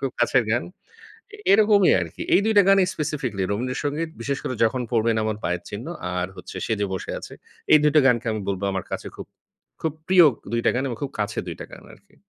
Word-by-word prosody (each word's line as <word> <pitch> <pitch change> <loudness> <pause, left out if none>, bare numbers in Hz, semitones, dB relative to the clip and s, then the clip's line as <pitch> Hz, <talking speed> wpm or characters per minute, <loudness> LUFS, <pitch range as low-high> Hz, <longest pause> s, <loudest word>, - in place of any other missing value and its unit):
খুব 135 -1 -2
কাছের 120 +1 +3
গান। 120 +2 +1 0.9
এরকমই 205 -1 +5
আরকি। 85 -2 -7
এই 200 - +5
দুইটা 220 -2 +5
গানেই 195 -2 +5
স্পেসিফিকলি, 135 -10 -3
'রবীন্দ্র 125 +5 -2
সঙ্গীত' 155 +3 -2
বিশেষ 140 +3 -2
করে, 130 - -3
"যখন 125 +3 +1
পড়বেন 115 -1 +2
আমার 110 -1 -2
পায়ের 90 0 -1
চিহ্ন" 105 +6 -6 0.3
আর 90 0 -1
হচ্ছে, - - -10
"সেজে 105 -3 0
বসে 95 - -4
আছে।" - - -10 0.4
এই 155 - +8
২টা 150 0 +5
গানকে 120 -2 +2
আমি 110 -1 -3
বলব 95 -1 -3
আমার 95 - -3
কাছে - - -5
খুব - - -8 0.5
খুব 160 -2 -1
প্রিয় 185 -2 +7 0.3
২ 115 - +1
টা - - +5
গান 130 - 0
এবং 120 -3 -5
খুব 140 - -4
কাছে 105 - -1
২ - - -5
টা - - -6
গান - - -12
আরকি। - - -22
125 Hz, 210 wpm, -23 LUFS, 110-155 Hz, 0.9 s, এই